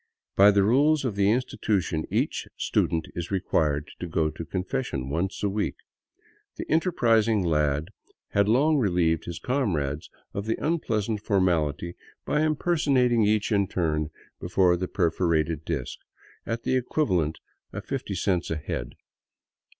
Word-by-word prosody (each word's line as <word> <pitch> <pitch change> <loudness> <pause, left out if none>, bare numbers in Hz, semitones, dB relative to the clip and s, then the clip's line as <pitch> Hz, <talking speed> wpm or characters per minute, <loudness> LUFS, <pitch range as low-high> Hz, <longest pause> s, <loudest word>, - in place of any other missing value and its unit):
By 100 +1 +7
the 100 -1 +4
rules 140 +7 +3
of 115 -5 -2
the 100 0 +3
institution 105 -8 0
each - - -1
student 80 -1 0
is 85 -1 -5
required 75 -6 0
to 90 - -4
go 80 -2 0
to 80 - -7
confession 90 - -3
once 90 +7 -2
a - - +3
week. 100 +1 -1 0.8
The - - -5
enterprising 115 - +3
lad 75 -1 +1 0.4
long 125 +10 +3
relieved 85 -7 +1
his 85 -2 -5
comrades 85 - -1 0.2
of 100 +2 -4
the 110 - 0
unpleasant 115 -10 -1
formality 85 -6 +1 0.3
by 150 - +1
impersonating 140 -7 +2
each 105 +1 +1
in 100 -2 +2
turn 75 -4 -1 0.3
before 90 0 +3
the 90 +1 -3
perforated 85 -3 0
disk 70 -7 -4 0.3
— - - -28
at 115 0 -3
the - - +1
equivalent 95 - 0 0.3
of - - -7
fifty - - -4
cents 90 -3 0
a 80 - -1
head. 75 - -5
95 Hz, 140 wpm, -26 LUFS, 80-115 Hz, 0.8 s, By